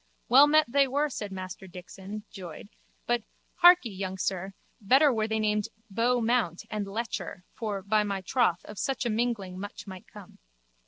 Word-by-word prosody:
Well 275 +4 +8
met 310 +1 +5
they 275 +3 +3
were, 290 +3 0
said 210 -5 -5
Master 190 0 -7
Dixon, 190 +3 -9
joyed, 185 -1 -9 0.4
but, 240 0 +1 0.4
harkee, 350 - +7
young 190 0 -4
sir, 190 +1 -3 0.3
better 265 +7 +5
were 220 -1 0
they 220 0 -1
named 210 -1 0 0.2
Beau 240 +4 +2
Mount 225 -7 0
and 210 -2 -3
Lecher 210 -3 -4
for, 205 -4 -4
by 210 +2 +2
my 200 -2 -3
troth, 185 -4 +1
of 210 - -9
such 270 -1 -1
a 235 - +1
mingling 215 -5 -2
much 205 +1 -7
might 190 -2 -10
come. 205 -3 -14
210 Hz, 170 wpm, -28 LUFS, 190-240 Hz, 0.4 s, Well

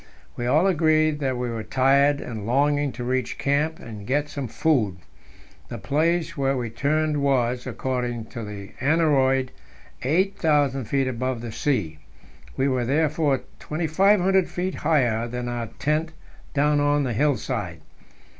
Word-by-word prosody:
We 120 - -3
all 155 +8 +3
agreed 155 -4 +3
that 130 -3 -1
we 125 -1 -2
were 115 -1 -4
tired, 140 +4 +3
and 110 -3 -6
longing 145 +3 +2
to 125 - -6
reach 130 0 -1
camp 150 +3 0
and 105 -3 -10
get 145 +3 0
some 140 -3 -4
food. 115 - +1 0.7
The - - -5
place 165 +3 0
where 135 -2 0
we 120 -3 -3
turned 150 +4 0
was, 125 -3 +1
according 125 -3 -3
to 115 - -5
the 100 -2 -8
aneroid, 135 -4 +2 0.5
8,000 150 - +1
feet 135 +3 0
above 130 -1 -2
the 120 -1 -6
sea; 110 - -1 0.6
we 135 - +2
were 130 -2 0
therefore 150 0 +1 0.2
2,500 185 +4 +2
feet 185 +1 -3
higher 125 -7 +1
than 125 +1 -4
our 120 -1 -3
tent 155 +2 -1 0.4
down 145 +1 +3
on 145 0 +2
the 125 -3 -1
hill 145 +3 +2
side. 100 -9 -4
140 Hz, 145 wpm, -24 LUFS, 120-155 Hz, 0.7 s, all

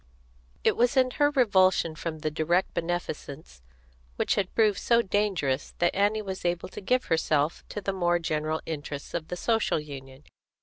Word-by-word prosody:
It - - +3
was 245 +3 +2
in 255 -1 +4
her 290 +2 +3
revulsion 190 - +3
from 160 0 -5
the 155 - -1
direct 170 +4 +1
beneficence 160 - -4 0.5
which - - +1
had 195 -2 -2
proved 215 -4 +3
so 235 0 +3
dangerous 185 -10 -1
that 175 - +2
Annie 205 +2 +2
was 190 -1 -5
able 175 0 -1
to - - -8
give 250 +6 +1
herself 155 -1 +1
to 210 - -5
the 195 0 -2
more 175 -2 +2
general 155 -1 -2
interests 145 -2 -6
of 160 -2 -3
the 180 - -5
Social 225 -4 +1
Union. 135 -2 -10
175 Hz, 170 wpm, -27 LUFS, 155-205 Hz, 0.5 s, in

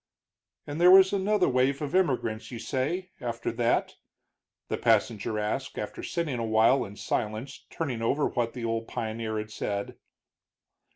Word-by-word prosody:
"And 145 +3 -4
there 180 - +8
was 190 +1 +8
another 200 0 +2
wave 130 +2 +2
of 150 +1 -4
immigration, 120 -11 0
you - - -6
say, 165 +10 -2
after 115 -1 -3
that?" 120 +1 0 0.7
the - - -2
passenger 110 -1 +1
asked, 105 +6 -3
after 105 - -5
sitting 160 -8 -2
a - - -1
while 115 +4 +4
in 100 0 -10
silence 110 +6 -3
turning 130 -8 -3
over 140 +6 +1
what 120 -2 -1
the 120 -2 -5
old 115 0 -2
pioneer 110 -2 -3
had 110 0 -5
said. 100 -1 -4
120 Hz, 155 wpm, -28 LUFS, 110-145 Hz, 0.7 s, there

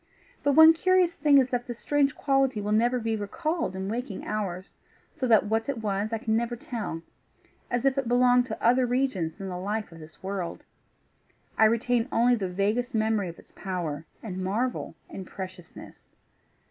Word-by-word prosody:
But 285 - +2
one 320 +2 +9
curious 365 +1 +3
thing 290 -3 +4
is 260 -2 +4
that 245 -1 -2
that 240 -2 -6
strange 285 0 +1
quality 270 -4 +1
will 205 0 -3
never 240 +4 +3
be 225 -1 -1
recalled 305 - -2
in 190 0 -4
waking 230 -1 -4
hours; 190 -3 -4 0.4
so 270 -5 -2
that 220 -3 +5
what 225 +4 -1
it 275 - -1
was 210 -1 -2
I 225 - 0
can 220 0 -1
never 235 +1 -1
tell 220 -9 -5 0.7
as 240 +1 -1
if 275 0 +2
it 270 - -3
belonged 245 +1 +4
to 220 - -5
other 250 +2 +4
regions 240 -11 -1
than 195 -1 -6
the 180 -1 -5
life 205 +1 -3
of 165 - -12
this 155 +2 -14
world: 190 -3 -4 0.9
I 220 - +5
retain 230 +2 +2
only 240 +2 +4
the 200 -6 -1
vaguest 210 +7 -1
memory 215 -3 +1
of 170 - -10
its - - -18
power, 165 -6 -4 0.2
and 185 -4 -5
marvel, 225 +7 -2
and 190 - -8
preciousness. 185 -3 -10
225 Hz, 185 wpm, -27 LUFS, 195-250 Hz, 0.9 s, one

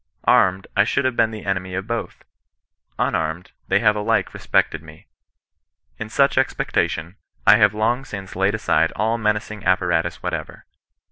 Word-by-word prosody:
Armed, 95 +1 +3
I - - +5
should 115 - 0
have 130 -2 0
been 110 - +3
the 110 -1 -9
enemy 95 -1 -2
of 95 +1 -3
both; 115 0 -5 0.7
unarmed, 80 +3 -2 0.2
they 100 +2 +2
have 105 -2 +4
alike 105 0 0
respected 80 - 0
me. 80 -1 -15 0.9
In - - -5
such - - +2
expectation, 85 +5 -1 0.3
I 105 - +8
have 105 -1 +4
long 115 +5 0
since 100 -6 -8
laid 95 +3 +1
aside 110 - +1
all 115 +2 0
menacing 105 -1 -2
apparatus 90 -1 0
whatever. - - -5
100 Hz, 150 wpm, -21 LUFS, 90-110 Hz, 0.9 s, I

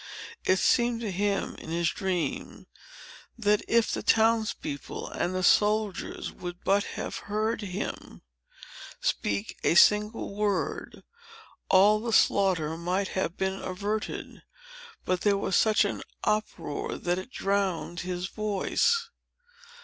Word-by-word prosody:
It 185 - +4
seemed 240 +3 +2
to 215 -4 -3
him, 200 +1 -1
in - - -10
his 170 0 +1
dream, 180 -7 -3 0.7
that 210 -2 +2
if 230 -1 +3
the - - -2
town's 225 0 +3
people 140 -1 -6
and 180 +1 -2
the 185 - -1
soldiers 210 0 +2
would 175 0 -8
but 200 +1 +3
have - - -4
heard 215 +2 0
him 200 0 -6 0.8
speak 100 +1 -2
a - - +3
single 210 +3 +4
word, 205 -2 -2 0.7
all 205 +3 +6
the 230 +1 -3
slaughter 180 -8 +3
might 185 +3 -1
have 185 -2 -2
been 190 0 -2
averted. 205 +3 -4 0.6
But 185 -1 0
there 205 -1 +3
was 195 -2 -1
such 215 -1 +4
an 200 - -3 0.2
uproar 210 -8 -2
that 175 +1 -1
it 185 - -8
drowned 195 -6 -1
his 180 0 -3
voice. 215 - 0
200 Hz, 125 wpm, -28 LUFS, 180-215 Hz, 0.8 s, all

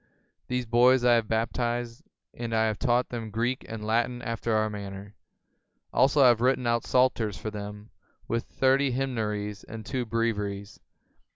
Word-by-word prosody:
These 125 -1 -1
boys 120 +2 +4
I 120 - +6
have 115 -2 +2
baptized, 120 +1 -2 0.3
and 115 -1 -4
I 110 0 +3
have 110 -1 -1
taught 125 -1 +1
them 115 -2 -5
Greek 120 +4 -1
and 110 -1 -6
Latin 120 +2 0
after 115 -1 -1
our 110 0 +2
manner. 100 -1 -7 0.8
Also 135 +2 +4
I 125 - +8
have 120 -1 +3
written 130 0 +2
out 120 -1 +1
Psalters 125 -5 +2
for 110 - -5
them, 105 0 -8 0.4
with 115 +2 -1
thirty 135 0 +2
Hymnaries 105 -6 -2
and 110 -1 -9
two 125 0 -3
Breviaries. 105 -3 -2
115 Hz, 160 wpm, -27 LUFS, 110-125 Hz, 0.8 s, I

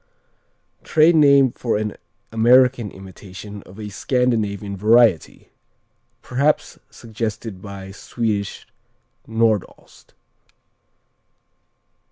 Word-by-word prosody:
_ - - -34
Trade 160 +2 +4
name 140 -4 +5
for 115 -2 -2
an 105 -1 -3 0.4
American 120 0 +4
imitation 95 +2 -11
of 95 +4 -14
a 105 -1 -6
Scandinavian 105 -4 -1
variety, 110 -3 +2 0.7
perhaps 140 +4 -1
suggested 110 -3 -6
by 100 -1 -9
Swedish 105 -1 -4 0.6
Nordost. 110 -3 -2
110 Hz, 80 wpm, -20 LUFS, 100-125 Hz, 0.7 s, name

